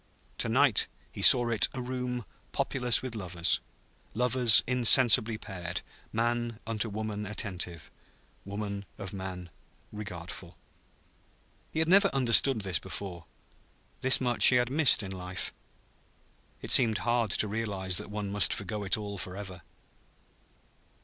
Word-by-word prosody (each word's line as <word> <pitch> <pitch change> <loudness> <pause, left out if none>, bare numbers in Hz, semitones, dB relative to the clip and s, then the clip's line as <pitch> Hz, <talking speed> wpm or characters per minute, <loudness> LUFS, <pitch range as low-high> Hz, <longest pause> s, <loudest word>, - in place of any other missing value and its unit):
To 115 - -2
night 130 -1 +2 0.2
he - - -9
saw 120 -2 +7
it 115 -2 +2
a - - -5
room 125 -2 -5 0.3
populous 125 -3 0
with 130 -3 -6
lovers, 90 -5 -1 0.6
lovers 125 -2 +5
insensibly 120 -2 +5
paired, 90 -4 -7 0.3
man 120 0 -2
unto 110 0 -3
woman 105 0 -5
attentive, 90 -6 -6 0.5
woman 100 0 -6
of 95 -1 -8
man 95 -3 -8 0.4
regardful. 90 -4 -9 1.1
He - - -8
had 160 0 0
never 200 +3 +5
understood 130 -1 +3
this 95 -4 -1
before. 90 -5 -8 0.8
This 130 0 +6
much 120 -2 -1
he 125 - +5
had 125 0 +1
missed 145 -6 +4
in 95 - -7
life. 90 0 -6 1.1
It - - -4
seemed 110 -3 +5
hard 120 -2 0
to 105 - 0
realize 100 -4 -2
that - - -4
one 105 -1 -5
must 105 0 +2
forego 105 +1 -6
it 100 - 0
all 100 -2 -7
for 90 +1 -7
ever. 95 -3 -9
105 Hz, 135 wpm, -28 LUFS, 95-120 Hz, 1.1 s, saw